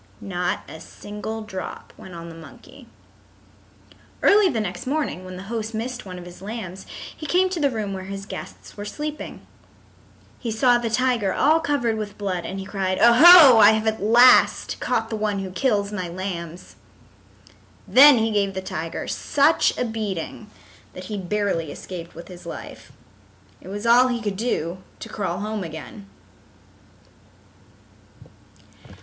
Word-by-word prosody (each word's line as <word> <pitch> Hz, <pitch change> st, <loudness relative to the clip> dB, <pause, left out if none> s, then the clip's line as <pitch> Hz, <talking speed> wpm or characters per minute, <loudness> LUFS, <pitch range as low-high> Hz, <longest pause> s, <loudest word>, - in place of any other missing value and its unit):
Not 180 Hz, -2 st, -3 dB
a 160 Hz, -, -10 dB
single 210 Hz, +5 st, -7 dB
drop 190 Hz, -3 st, -8 dB
went 185 Hz, -, -12 dB
on 170 Hz, 0 st, -8 dB
the -, -, -10 dB
monkey. 165 Hz, -1 st, -14 dB, 1.4 s
Early 410 Hz, -2 st, +5 dB
the 235 Hz, -, -2 dB
next 185 Hz, +1 st, -5 dB
morning 280 Hz, -, -2 dB
when 185 Hz, 0 st, -9 dB
the 185 Hz, -, -8 dB
host 220 Hz, +1 st, -5 dB
missed 245 Hz, 0 st, -5 dB
one 180 Hz, -1 st, -8 dB
of 175 Hz, -, -10 dB
his 175 Hz, 0 st, -12 dB
lambs 195 Hz, -3 st, -7 dB, 0.3 s
he 310 Hz, -, -8 dB
came 370 Hz, +4 st, +2 dB
to 360 Hz, -, -3 dB
the 285 Hz, -2 st, +2 dB
room 215 Hz, -5 st, -4 dB
where 190 Hz, -1 st, -6 dB
his 195 Hz, 0 st, -7 dB
guests -, -, -10 dB
were 205 Hz, -, -7 dB
sleeping. 300 Hz, +8 st, -7 dB, 0.9 s
He 235 Hz, -, -4 dB
saw 240 Hz, +2 st, +3 dB
the 235 Hz, -1 st, -3 dB
tiger 245 Hz, -4 st, +1 dB
all 315 Hz, +3 st, +3 dB
covered 280 Hz, -8 st, -1 dB
with 205 Hz, -1 st, -6 dB
blood 185 Hz, -4 st, -3 dB
and 195 Hz, -, -6 dB
he 190 Hz, -, -6 dB
cried, 190 Hz, -2 st, -2 dB
"O 235 Hz, -, +6 dB
ho, 300 Hz, -3 st, +9 dB
I 210 Hz, 0 st, +8 dB
have 220 Hz, 0 st, -1 dB
at 220 Hz, -1 st, -1 dB
last 240 Hz, +4 st, +5 dB
caught 225 Hz, -2 st, -1 dB
the -, -, -1 dB
one 210 Hz, -1 st, -1 dB
who 190 Hz, -1 st, -5 dB
kills 205 Hz, -1 st, 0 dB
my 185 Hz, -4 st, -4 dB
lambs." 175 Hz, -1 st, -7 dB, 1.1 s
Then 280 Hz, 0 st, +8 dB
he 225 Hz, 0 st, 0 dB
gave 200 Hz, -2 st, 0 dB
the 190 Hz, -, -3 dB
tiger 165 Hz, -2 st, -5 dB
such 290 Hz, +3 st, +2 dB
a -, -, -1 dB
beating 215 Hz, -2 st, -5 dB, 0.4 s
that 185 Hz, -, -9 dB
he -, -, -3 dB
barely 190 Hz, -5 st, -2 dB
escaped 170 Hz, 0 st, -9 dB
with 170 Hz, +1 st, -10 dB
his 180 Hz, -2 st, -12 dB
life. -, -, -9 dB, 0.7 s
It -, -, -14 dB
was 205 Hz, +3 st, -6 dB
all 245 Hz, +2 st, +6 dB
he 245 Hz, -2 st, -2 dB
could 205 Hz, -3 st, -3 dB
do 185 Hz, -5 st, -2 dB, 0.2 s
to 225 Hz, -, -9 dB
crawl 190 Hz, -3 st, -3 dB
home 215 Hz, -1 st, -3 dB
again. 170 Hz, +5 st, -9 dB
210 Hz, 165 wpm, -23 LUFS, 185-235 Hz, 1.4 s, ho